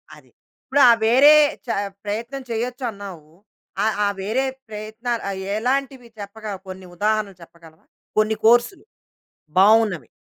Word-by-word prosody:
అది. - - -20 0.3
ఇప్పుడు 280 +1 +2
ఆ - - +9
వేరే 270 +6 +7 0.3
చ - - -31 0.4
ప్రయత్నం 230 +6 -4
చేయొచ్చన్నావు. 220 - -5 0.6
ఆహ్, 220 - +1
ఆహ్, 200 -1 -1
వేరే 230 +7 -1 0.2
ప్రయత్నాలు, 220 +3 -5
ఆహ్, 195 -1 -5 0.2
ఎలాంటివి 260 +1 -2
చెప్పగ 205 +2 -10 0.2
కొన్ని 185 0 -9
ఉదాహరణలు 210 -1 -1
చెప్పగలవా? 165 -1 -17 0.3
కొన్ని 215 0 +2
కోర్సులు 240 - +3 0.8
బావున్నవి. 210 -2 +4
220 Hz, 120 wpm, -21 LUFS, 200-240 Hz, 0.8 s, ఆ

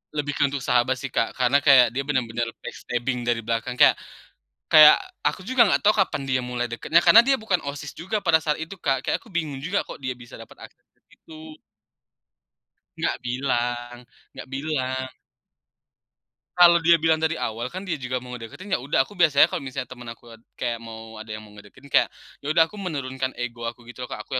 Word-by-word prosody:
Lebih 145 -1 -1
ke - - 0
untuk 135 -1 -5
sahabat 125 +1 +2
sih 130 0 -7
Kak. 115 - -1
Karena 130 +2 +3
kayak 135 -5 +6
dia 135 +3 -3
benar-benar 120 -4 -1 0.2
backstabbing 125 0 -4
dari 120 -1 +1
belakang 115 +2 -2
kayak - - +6 0.8
kayak 150 -1 +9 0.3
aku 185 - -1
juga 240 +3 +3
nggak - - +1
tahu 210 +1 +4
kapan - - +1
dia 130 0 +2
mulai 125 -1 -4
deketnya, 160 +8 +2
karena 230 +6 +7
dia 275 - +4
bukan 220 -7 0
OSIS 140 +1 -6
juga 200 +5 -4
pada 160 -1 +4
saat 150 -1 -1
itu 165 +5 -8
Kak, 135 -5 0
kayak - - -1
aku - - -26
bingung 160 -9 -4
juga 180 +9 -1
kok - - -10
dia 130 -2 -4
bisa 120 -2 -13
dapat 115 - -14
akses - - -39
ke - - -41
situ. 155 -1 -14 1.4
Nggak - - -1
bilang 120 -1 -2 0.4
nggak - - -9
bilang. 130 -2 -2 1.5
Kalau 170 -1 +7
dia 170 +1 +5
bilang 160 0 +1
dari 160 +1 0
awal 120 0 -4
kan, 185 +2 -7
dia 165 -7 -4
juga 125 0 -2
mau 125 0 -9
ngedeketin, 125 - -8
ya - - +1
udah, 135 0 +1
aku - - -15
biasanya 165 -6 +5
kalau - - -4
misalnya 130 -1 -5
teman 120 -2 -10
aku 115 +1 -11 0.3
kayak 120 -2 -3
mau 115 -1 -10
ada 110 - -12
yang 110 - -12
ngedeketin, 105 +6 -16
kayak, 140 - +2 0.3
ya 145 - -5
udah 160 +1 +5
aku 205 +5 -11
menurunkan 130 -7 -3
ego 120 -1 -5
aku 120 0 -14
gitu 120 +2 -11
loh 125 - -6
Kak, 105 - -7
aku - - -9
135 Hz, 200 wpm, -24 LUFS, 120-160 Hz, 1.5 s, kayak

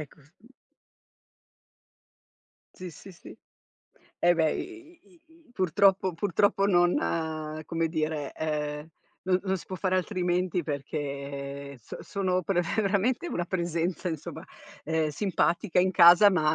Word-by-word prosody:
Ecco, 155 0 -11
s 145 +3 -26
mh. 225 - -20 2.3
Sì, 180 -1 -8
sì, 170 +5 -13
sì. 170 - -13 0.8
Eh, 175 0 +4
beh, 160 -2 +2
i 345 -2 -8
i 345 -3 -24
i 320 - -23
i - - -23
purtroppo 190 -1 +2
purtroppo 200 +3 +1
non 175 -3 +3 0.7
come 165 +1 -1
dire, 155 -3 -2
ehm, 150 -1 -3 0.4
non 185 0 +2
non 190 -1 0
si - - -12
può 190 - -6
far 185 0 -1
altrimenti, 180 -1 0
perché 140 -1 -5
so - - -9
sono 185 -2 -1
pre 175 0 +1 0.2
veramente, 215 - +1
una 175 - -2
presenza, 175 0 -2
insomma, 160 -4 -6 0.4
ehm, 160 -1 0
simpatica 180 +2 0
in 185 +1 +3
casa, 175 +3 +8
ma 155 -5 +2
175 Hz, 135 wpm, -27 LUFS, 155-190 Hz, 2.3 s, casa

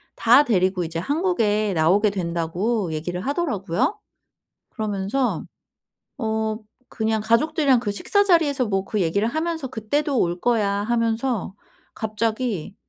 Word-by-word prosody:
다 245 +5 +6
데리고 185 -6 +1
이제 165 0 -4
한국에 220 - 0
나오게 185 +7 +3
된다고 175 +2 -2
얘기를 175 +4 -4
하더라고요. 270 - -1 0.7
그러면서 215 +4 -1 0.7
어 220 -2 -1 0.3
그냥 220 -1 -1
가족들이랑 265 +4 +3
그 210 -4 -2
식사 405 - +1
자리에서 295 -8 +3
뭐 195 -2 0
그 210 -2 -1
얘기를 200 +6 +1
하면서 320 -1 -2
"그때도 260 +4 -1
올 175 +1 0
거야."하면서 225 0 0 0.4
갑자기 220 -3 -2
220 Hz, 290 characters per minute, -23 LUFS, 195-260 Hz, 0.7 s, 다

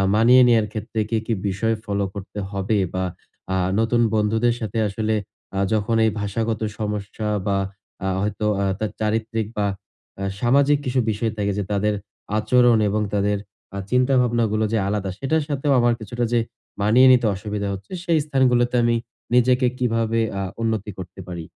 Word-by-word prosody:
মানিয়ে 120 +4 +6
নেওয়ার 115 -3 +4
ক্ষেত্রে 110 0 -4
কি, 115 - +1
কি 115 - 0
বিষয় 110 +4 0
ফলো 100 -1 -1
করতে 100 +1 -7
হবে 100 +2 0 0.2
বা 95 0 -1 0.5
আ - - +1 0.2
নতুন 115 +1 +2
বন্ধুদের 110 +3 +2
সাথে 110 -1 -4
আসলে 110 +2 -1 0.4
আ - - +1
যখন 110 +1 +1
এই 110 - +2
ভাষাগত 110 +2 -2 0.2
সমস্যা 105 0 -3 0.2
বা 100 -1 +2 0.5
আ - - 0
হয়তো 105 +1 -2 0.2
আ - - +1
তার 110 -1 -2
চারিত্রিক 110 0 -1
বা 105 - +1 0.5
অ্যা 95 - -3 0.2
সামাজিক 140 +4 +4
কিছু 130 -1 0
বিষয় 110 +2 -1
থাকে। 100 -1 0
যে 105 - 0
তাদের 105 +1 +1 0.4
আচরণ 120 +1 +4
এবং 105 +2 0
তাদের 105 0 +1 0.4
আ - - -3
চিন্তাভাবনাগুলো 120 -4 +2
যে - - +3
আলাদা, 100 -1 -1
সেটার 155 +3 +1
সাথেও 145 0 0
আমার 120 0 +3
কিছুটা 120 +3 -4
যে 120 - +4 0.4
মানিয়ে 115 +6 +6
নিতে 125 -2 +4
অসুবিধা 105 +1 -4
হচ্ছে। 95 0 -9
সেই 170 -3 +2
স্থানগুলোতে 125 -4 +2
আমি 120 0 +3 0.4
নিজেকে 125 +1 +4
কিভাবে 115 -2 0 0.2
আ - - -1 0.2
উন্নতি 110 -2 -1
করতে 95 0 -9
পারি? 85 -2 -6
110 Hz, 165 wpm, -22 LUFS, 105-120 Hz, 0.5 s, মানিয়ে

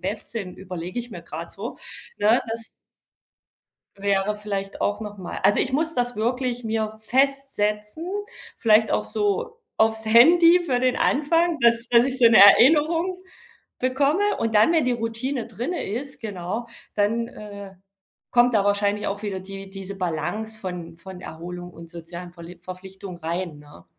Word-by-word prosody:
Bett 200 +3 -4
sind, 200 -6 -6
überlege 180 +2 -6
ich 240 0 -5
mir 175 - -8
grad 165 0 -8
so, 215 +5 -7 0.4
ne, 220 +4 +4
das 225 0 -5 1.3
wäre 200 +1 0
vielleicht 200 -2 -5
auch 205 +1 0
noch 210 -2 -7
mal 180 - -6
also 200 +2 +4
ich 260 - +2
muss 320 +3 0
das 245 0 -1
wirklich 245 +2 -1
mir 220 -1 -2
festsetzen, 260 0 0 0.5
vielleicht 220 -1 +4
auch - - +1
so 450 +3 -1 0.2
aufs 220 0 +2
Handy 335 +10 +7
für 250 -6 +1
den 255 -1 +2
Anfang, 330 +3 +2
dass 235 0 +3
dass 240 +1 +5
ich 265 0 -2
so 240 - +7
'ne 230 -1 +6
Erinnerung 325 - +5 0.6
bekomme 285 +11 +1
und 225 -1 -1
dann, 220 +11 +5
wenn 320 -5 +3
die 250 - +1
Routine 235 +3 -3
drinne 310 +10 -4
ist 270 +7 -5
genau, 205 +2 -4 0.3
dann, 225 +3 +1
äh, 200 -2 -10 0.6
kommt 245 -1 +4
da 200 -2 +3
wahrscheinlich 205 0 +1
auch 200 +1 -3
wieder 195 -3 -3
die 195 +1 -9
diese 195 0 -8
Balance 190 +6 -3
von 175 -3 -6
von 185 +1 -10
Erholung 175 +2 -8
und 165 0 -12
sozialen 170 +1 -9
Verlie 170 0 -11
Verpflichtungen 185 0 -9
rein, 165 -1 -3
ne? 145 -12 -16
215 Hz, 160 wpm, -24 LUFS, 190-250 Hz, 1.3 s, Handy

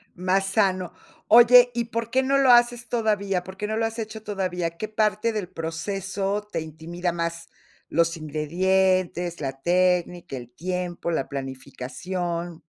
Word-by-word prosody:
Más 185 +2 +1
sano. 190 -3 +1 0.4
Oye, 245 +2 +8
¿y 235 -1 0
por 230 0 -4
qué 260 +2 +2
no 275 +1 +2
lo 270 -2 +5
haces 240 -1 +4
todavía? 200 -5 0
¿Por 190 +1 -10
qué 210 - -3
no 220 +1 -2
lo 225 0 +1
has 225 +1 -6
hecho 220 0 -5
todavía? 185 -5 -2
¿Qué 215 - -4
parte 215 +1 +1
del 205 -5 -3
proceso 195 +5 -3
te - - -2
intimida 165 +3 -4
más? 170 0 -4 0.4
¿Los 170 0 +1
ingredientes, 175 +3 0
la 135 -1 -4
técnica, 180 -3 +1
el 120 -1 -9
tiempo, 180 +1 -3
la 160 -5 -1
planificación? 160 +6 -5
185 Hz, 150 wpm, -25 LUFS, 170-215 Hz, 0.4 s, Oye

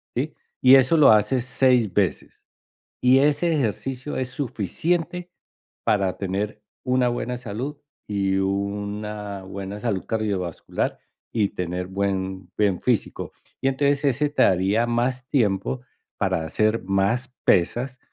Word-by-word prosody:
¿sí? 145 +5 -2 0.3
Y 130 +1 +8
eso 135 +4 +5
lo 145 -6 +8
haces 110 +4 +3
6 125 -5 +3
veces. 95 -6 -1 0.6
Y 130 +1 +6
ese 150 +4 +2
ejercicio 130 +1 -2
es 130 -1 -1
suficiente 165 - -2 0.5
para 100 -4 +1
tener 100 +2 -3 0.2
una 125 -1 +2
buena 120 +1 -3
salud, 125 +5 -5 0.3
y 100 -2 0
una 100 +1 -3
buena 100 +1 -6
salud 105 -5 -2
cardiovascular, 100 -6 -2 0.3
y 105 -4 +2
tener 90 -2 -4
buen 95 -1 -2
buen 100 -4 +2
físico. 120 -5 -1 0.3
Y 135 - +1
entonces 140 +1 +1
ese 140 +2 +2
te 145 - 0
daría 95 +6 +3
más 125 +2 -1
tiempo 115 0 +1 0.4
para 80 - 0
hacer 110 +7 +1
más 100 +7 0
pesas, 125 +9 +2
110 Hz, 125 wpm, -24 LUFS, 100-130 Hz, 0.6 s, Y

